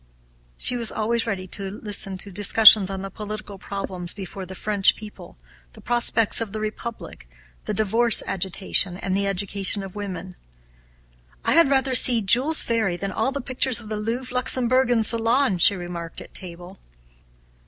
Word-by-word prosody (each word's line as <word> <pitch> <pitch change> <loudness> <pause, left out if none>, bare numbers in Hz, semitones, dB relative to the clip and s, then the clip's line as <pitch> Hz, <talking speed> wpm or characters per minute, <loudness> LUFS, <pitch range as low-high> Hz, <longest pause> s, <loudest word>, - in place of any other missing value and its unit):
She 250 - +4
was 235 -2 -1
always 230 +2 -2
ready 190 -4 -4
to 195 0 -4
listen 200 -1 -3
to 200 +1 -6
discussions 205 +1 +5
on 195 0 -6
the 195 - -8
political 210 -2 -8
problems 185 -3 -7
before 190 -1 -9
the 190 - -10
French 205 0 +1
people, 210 - -13 0.4
the - - -15
prospects 235 -2 +1
of 215 -3 -6
the 215 - -5
Republic, 215 - -8 0.4
the - - -3
divorce 225 +2 +3
agitation, 190 -1 -1
and 190 0 -4
the 200 0 -1
education 195 +1 +2
of 190 -1 -10
women. 190 -3 -8 1.1
'I - - +2
had 335 -4 +4
rather 270 -1 +1
see 245 -3 +5
Jules 255 +11 +4
Ferry 220 -7 -2
than 195 +2 -5
all 265 - -2
the 280 - -5
pictures 255 -1 0
of 220 -3 -12
the 215 - -4
Louvre, 235 +4 -5
Luxembourg, 255 0 +2
and 230 -2 +1
Salon,' 230 -2 +1
she 200 - +6
remarked 175 -2 -8
at - - -14
table. 180 +1 -8
210 Hz, 165 wpm, -22 LUFS, 190-235 Hz, 1.1 s, she